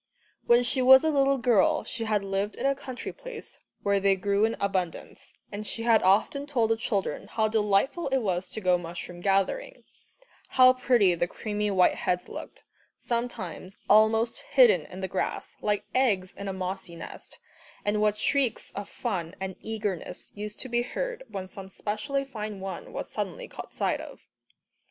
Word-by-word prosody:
When 240 +1 +6
she 255 +2 +2
was 265 +2 +8
a 315 - +2
little 275 -1 +3
girl, 235 -6 +3
she 230 -2 -4
had 210 -2 +1
lived 195 +1 -2
in - - -4
a 275 - +4
country 265 -2 -6
place - - -9 0.2
where 200 0 +2
they 195 0 +3
grew 200 +2 +2
in 225 - -1
abundance, 190 -4 -3 0.2
and 205 +1 -5
she 225 - -3
had 230 -2 +5
often 220 +9 +2
told 235 -6 +1
the - - +4
children 205 - -2
how 220 -1 +1
delightful 215 - +1
it 270 0 +2
was 185 -7 -1
to 220 - -6
go 180 -2 +3
mushroom 175 +1 -7
gathering, 205 - 0 0.6
how 255 0 +6
pretty 245 -7 +3
the 175 0 0
creamy 210 +2 -2
white 185 -2 +4
heads 180 0 -1
looked, - - -9 0.3
sometimes 205 -6 -4
almost 220 +2 +4
hidden 235 - +4
in 185 - -9
the 190 - -1
grass, 190 0 -3
like 205 -1 0
eggs 205 -8 +2
in 200 - -6
a - - -1
mossy 185 -1 -4
nest, 165 - -9 0.5
and 210 +1 +1
what 210 0 +2
shrieks 270 +1 0
of 200 0 -6
fun 185 -8 -3
and 190 -1 -4
eagerness 210 -5 -4
used 210 0 -6
to - - -5
be 240 -1 +1
heard - - -4
when 195 -4 -6
some 190 0 -10
specially 245 +8 -2
fine 215 -6 -6
one 190 0 -6
was - - -5
suddenly - - -4
caught - - -10
sight - - 0
of. - - -11
210 Hz, 175 wpm, -27 LUFS, 190-245 Hz, 0.6 s, was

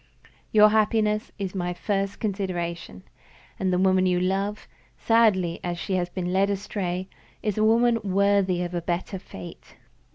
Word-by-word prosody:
Your 210 0 +7
happiness 215 0 +1
is 195 -2 -4
my 180 -2 -2
first 195 +1 -2
consideration, 175 - -4 0.6
and 190 -1 0
the 180 - +2
woman 185 0 +3
you 180 -1 +2
love 195 +3 -1 0.3
(sadly 205 -7 +2
as 175 -1 -3
she 190 - -4
has 180 -1 0
been 180 0 -3
led 195 +1 +3
astray) 190 -2 -3 0.4
is 210 -3 -1
a 215 - +1
woman 230 +1 +4
worthy 195 -2 +2
of 175 0 -5
a 175 - -2
better 175 +3 -3
fate. 95 - -11
190 Hz, 155 wpm, -25 LUFS, 180-210 Hz, 0.6 s, Your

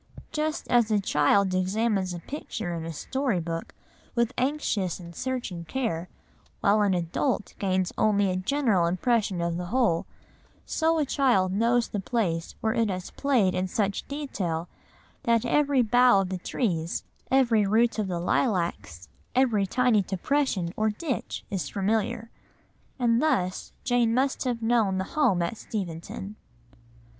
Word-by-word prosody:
Just 310 0 -2
as 235 -2 +3
a 210 -1 +3
child 190 +2 +2
examines 190 +1 0
a 175 - -4
picture 220 - -5
in 165 -1 -4
a 165 - -4
story 255 - -1
book 165 0 -5 0.4
with 235 +1 +1
anxious 250 - -1
and 170 -1 -11
searching 245 -10 -3
care, 175 -3 -3 0.5
while 210 +2 +3
an 200 -2 +3
adult 180 - -1
gains 185 -2 0
only 205 -3 +3
a - - -1
general 195 -3 +1
impression 195 0 +1
of 170 0 -1
the 180 0 -4
whole, 225 -7 +1 0.6
so 325 0 +1
a 305 - +2
child 245 -10 +2
knows 230 +4 +2
the 205 - -3
place 185 -6 -1
where 220 0 +1
it 230 -3 +1
has 185 -1 -4
played 245 -10 +2
in 185 +1 -1
such 200 +1 -1
detail 190 - -3 0.5
that 235 0 +2
every 280 0 +3
bough 245 -2 +5
of 190 - -3
the 185 -1 -3
trees, 170 -5 -2 0.3
every 240 -5 +4
root 230 +2 +2
of 210 - 0
the 175 -2 -2
lilacs, 170 - -1 0.3
every 230 -7 +3
tiny 245 0 +3
depression 190 -1 -1
or 215 0 +1
ditch 255 +4 -4
is 185 -7 -2
familiar. 215 +2 -1 0.7
And 240 -1 +2
thus 185 -13 0
Jane 240 -2 +2
must 265 +1 0
have 240 -2 -2
known 225 -5 +2
the 190 - 0
home 195 - +3
at 170 +6 -3
Steventon. 195 +1 -6
210 Hz, 150 wpm, -27 LUFS, 185-245 Hz, 0.7 s, bough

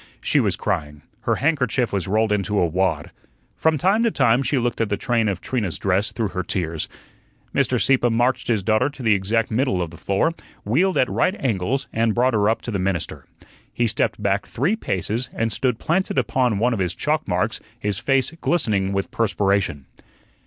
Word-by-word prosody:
She - - +2
was - - +1
crying; 75 0 -3 0.3
her 115 - +4
handkerchief 125 -5 +1
was 95 -3 -1
rolled 110 +2 +1
into 105 0 0
a 90 - +4
wad. 90 +3 -1 0.4
From 160 -1 +2
time 195 +8 +2
to 230 - +3
time 130 - +3
she 135 +1 0
looked 120 -1 -1
at 110 - 0
the 100 - 0
train 115 +1 +1
of 95 -3 -3
Trina's 110 -9 -2
dress 95 +2 0
through 110 -4 -2
her 90 0 -3
tears. 85 -3 -2 0.6
Mr. - - +1
Sieppe 130 -3 +3
marched 120 +3 +1
his 110 -5 +1
daughter 110 +6 +2
to 140 -3 -10
the 110 -2 +4
exact 105 +4 0
middle 120 -4 +1
of 85 -2 -3
the 85 - -12
floor, 100 - +1 0.3
wheeled 175 - +2
at 130 - +3
right 185 - +1
angles, 120 +2 -1
and 115 -1 +1
brought 125 +1 +2
her 105 -1 +3
up 115 - -1
to 120 - -4
the 100 - -1
minister. 95 -2 -2 0.4
He 120 - 0
stepped 110 -1 0
back 100 0 0
three 155 - 0
paces, 115 - -2
and 115 0 -1
stood 125 -4 0
planted 175 +2 -1
upon 125 -3 +1
one 120 +4 +2
of 110 - -2
his 90 -2 0
chalk 155 +1 -1
marks, 100 +4 0 0.2
his 105 -4 -2
face 135 -1 +1
glistening 105 - +1
with 100 0 -2
perspiration. 100 -9 0
110 Hz, 195 wpm, -22 LUFS, 100-130 Hz, 0.6 s, her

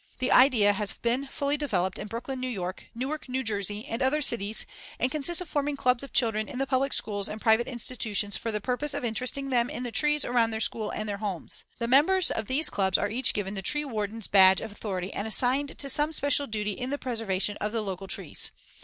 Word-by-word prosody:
The 255 0 0
idea 240 -6 +6
has 205 0 0
been 245 +4 -1
fully 280 +2 -1
developed 190 -11 -1
in - - -5
Brooklyn, 255 +4 -5
N.Y., 190 -8 -3 0.2
Newark, 270 +4 -4
N.J., 210 -5 -1
and 230 0 -4
other 265 +3 +2
cities 220 -7 0 0.3
and 255 - 0
consists 310 +4 +2
of 360 - -6
forming 290 -1 -1
clubs 250 -1 +2
of 275 - -9
children 220 -3 +1
in 270 - -6
the 270 - 0
public 270 +1 +1
schools 205 -2 0
and 215 - -6
private 220 +1 +3
institutions 220 -4 -1
for 230 - -3
the 210 - -1
purpose 265 +6 -2
of 285 -3 -3
interesting 255 +4 -2
them 240 -1 +2
in 250 - -5
the 245 - -4
trees 300 +3 +2
around 240 -2 +2
their 220 -1 -3
school 220 0 0
and 215 - -4
their 205 -1 -3
homes. 200 -5 -3
The 235 - -2
members 325 +9 +4
of 220 -2 -3
these 290 +5 +2
clubs 190 -2 +2
are 205 - -1
each 255 +4 +1
given 195 -1 -2
the 195 - -4
tree 295 +10 +2
warden's 220 -3 -3
badge 190 -2 +7
of 220 - -6
authority 195 -3 -4
and 205 - -3
assigned 260 +5 +1
to 280 - -2
some 295 +3 +2
special 285 -1 +2
duty 210 -2 -2
in 250 +5 -5
the 285 - -1
preservation 220 -6 -1
of 210 - -2
the 225 0 -1
local 195 -1 -5
trees. - - -1
235 Hz, 225 wpm, -27 LUFS, 210-270 Hz, 0.3 s, badge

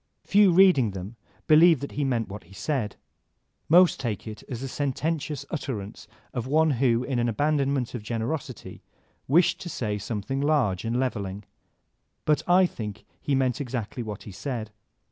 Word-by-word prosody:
Few, 200 -1 +5
reading 175 - +5
them, 95 +3 -7 0.3
believe 160 0 +6
that 140 - -5
he 145 - -2
meant 120 -5 0
what 105 -2 -9
he 95 - -17
said. 110 0 -2 0.7
Most 175 +2 +6
take 115 -6 -3
it 110 0 -7
as 125 -2 -5
the 135 - -3
sententious 145 +2 -2
utterance 105 - -5 0.3
of 125 -1 -3
one 155 +3 +3
who, 125 -2 +2
in 130 -2 -1
an 120 0 +1
abandonment 140 0 0
of 120 - -4
generosity, 120 +4 -4 0.5
wished 165 +6 +3
to 175 - -6
say 105 -8 -3
something 115 +6 -3
large 140 -11 +1
and 115 +2 0
leveling. 105 -6 -3 0.8
But 150 -2 +3
I 185 +1 +6
think 105 - -6 0.2
he 140 - 0
meant 130 0 +1
exactly 125 -2 -4
what 105 -3 -6
he 105 - -9
said. 110 +2 -5
130 Hz, 165 wpm, -26 LUFS, 110-150 Hz, 0.8 s, believe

